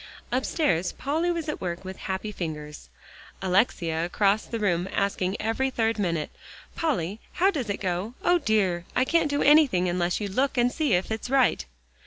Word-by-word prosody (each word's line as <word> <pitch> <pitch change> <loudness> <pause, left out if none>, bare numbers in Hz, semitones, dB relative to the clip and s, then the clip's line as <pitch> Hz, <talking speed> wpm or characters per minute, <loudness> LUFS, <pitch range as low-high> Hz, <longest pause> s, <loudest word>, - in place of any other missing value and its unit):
Upstairs 235 - 0
Polly 315 +6 -1
was 335 -2 -2
at 300 - -4
work 175 0 -4
with 190 0 -7
happy 190 +2 -4
fingers, 150 - -6 0.5
Alexia 180 -4 +1
across 200 +4 +1
the 230 - -3
room, 185 -4 0
asking 200 -1 -1
every 225 +5 0
third 225 -3 0
minute, 170 -6 -1 0.4
"Polly, 215 - -1
how 380 +2 +3
does 260 - -3
it 200 - -1
go? 190 +5 -2
O 350 0 +4
dear! 190 - +1
I 255 - +3
can't 330 +1 +2
do 285 0 0
anything 280 - +5
unless 175 0 0
you 210 - -2
look 260 +8 0
and 245 0 +3
see 300 -6 0
if 180 +4 +1
it's 220 +2 -3
right." 265 -2 +3
205 Hz, 175 wpm, -26 LUFS, 180-265 Hz, 0.5 s, anything